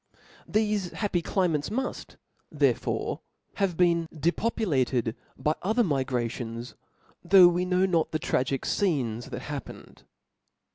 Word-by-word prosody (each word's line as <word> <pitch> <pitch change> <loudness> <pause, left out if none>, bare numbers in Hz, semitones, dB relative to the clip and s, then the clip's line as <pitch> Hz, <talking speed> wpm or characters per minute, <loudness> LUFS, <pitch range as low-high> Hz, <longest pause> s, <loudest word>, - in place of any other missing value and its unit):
Thefe 210 -4 0
happy 200 -5 -1
climates 165 -5 0
muft 260 +5 -4 0.4
therefore - - 0 0.4
have 195 -5 0
been 170 -2 +2
depopulated 150 - 0 0.2
by 150 - +1
other 220 +6 +2
migrations^ 125 - -2 0.5
though 185 0 +8
we 175 +1 +1
know 180 +1 +2
not 170 -4 +1
the 155 - -1
tragical 135 -2 -1
fcenes 130 - 0
that - - -6
happened. - - -8
170 Hz, 110 wpm, -27 LUFS, 135-190 Hz, 0.5 s, though